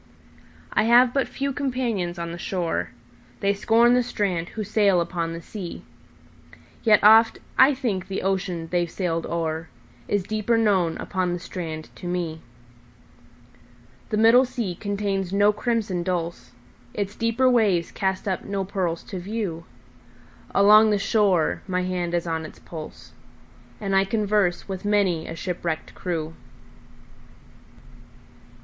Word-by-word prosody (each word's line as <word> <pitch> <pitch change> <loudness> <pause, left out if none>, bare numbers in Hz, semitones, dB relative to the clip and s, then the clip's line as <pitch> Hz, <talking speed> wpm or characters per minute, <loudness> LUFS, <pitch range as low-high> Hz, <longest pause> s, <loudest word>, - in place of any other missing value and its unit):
I - - +3
have 245 +2 +5
but 275 -2 +1
few 275 0 -3
companions 240 -10 -2
on 170 0 -4
the 170 - -7
shore:They 165 -3 -3
scorn 225 +4 +4
the 250 - +4
strand 190 -8 -2
who 220 - -5
sail 200 -3 +3
upon 170 -1 -2
the 165 0 -7
sea; 185 -4 -7 1.0
Yet 215 -2 +4
oft 225 +2 +7 0.2
I 265 +2 +6
think 205 -8 -2
the 195 - -4
ocean 185 -3 -1
they've 175 -1 +1
sailed 165 -2 -2
o'erIs 160 - -4
deeper 215 +3 0
known 190 -7 +2
upon 185 -2 -2
the 175 - -3
strand 160 -3 -6
to 175 - -7
me. 170 -3 -3 1.7
The 215 - -1
middle 230 +4 +6
sea 245 -7 -3
contains 200 -1 -2
no 205 +1 +4
crimson 210 -5 -1
dulse, 175 -1 -3 0.5
Its 205 0 -3
deeper 230 +3 +1
waves 210 -9 +2
cast 190 0 -2
up 185 -2 -1
no 200 -1 -3
pearls 180 -4 -2
to 190 - -6
view; 185 -4 -4 0.8
Along 210 +2 +6
the 210 - +2
shore 195 -5 +2
my 180 -1 -1
hand 180 -1 -2
is 170 - -1
on 165 -1 -2
its 155 - -10
pulse, 155 -2 -10 0.7
And 195 -3 -1
I 195 0 +4
converse 205 -3 0
with 190 -2 -5
many 200 -6 +1
a 165 - -6
shipwrecked 170 -2 -4
crew. 165 -3 -4
190 Hz, 135 wpm, -24 LUFS, 170-215 Hz, 1.7 s, oft